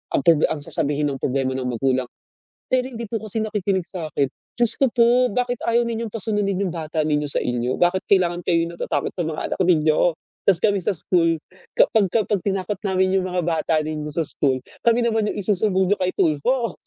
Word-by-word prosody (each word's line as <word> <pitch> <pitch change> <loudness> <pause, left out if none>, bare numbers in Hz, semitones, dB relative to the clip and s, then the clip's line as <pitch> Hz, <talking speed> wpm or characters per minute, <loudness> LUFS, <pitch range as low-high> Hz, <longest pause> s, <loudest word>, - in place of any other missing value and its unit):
ang - - +2
proble 165 -3 +5
ang 150 -2 -3
sasabihin 145 +1 0
ng 135 - -5
problema 130 0 0
ng 130 -1 -3
magulang. 130 +1 0 0.6
"Pero 255 0 +2
hindi 235 -2 -7
po 225 - -2
kasi 220 0 -4
nakikinig 200 -3 -1
sa'kin." 155 -6 -2 0.3
Diyos 240 -2 +4
ko 270 - +4
po! 245 +1 +4
"Bakit 245 +1 -2
ayaw 235 +1 +2
ninyo 230 -1 -3
pa-sunudin 205 -3 -1
'yung 170 - -5
bata 155 -1 -4
ninyo 150 -1 +1
sa - - 0
inyo? 125 +1 -1
Bakit 180 +2 +2
kailangan 175 -2 +3
kayo 170 -1 +2
natatakot 170 - -3
sa 175 - -2
mga 160 -1 -4
anak - - -7
ninyo?" 160 -1 +3 0.4
Tapos 185 -3 +5
kami 205 -2 +3
sa - - +1
school, 165 -1 +1 0.4
kapag 215 -3 +4
kapag 210 -2 +1
tinakot 195 0 -1
namin 190 -1 +1
'yung 190 - +2
mga 180 0 -2
bata 165 -1 0
ninyo 155 -1 -4
sa 165 +2 -1
school, 130 -3 0 0.2
kami 235 0 +4
naman 220 -2 +1
'yung - - -7
isusumbong 190 -1 +1
niyo - - +5
kay 185 0 +1
Tulfo. 230 - +1
185 Hz, 195 wpm, -22 LUFS, 155-215 Hz, 0.6 s, proble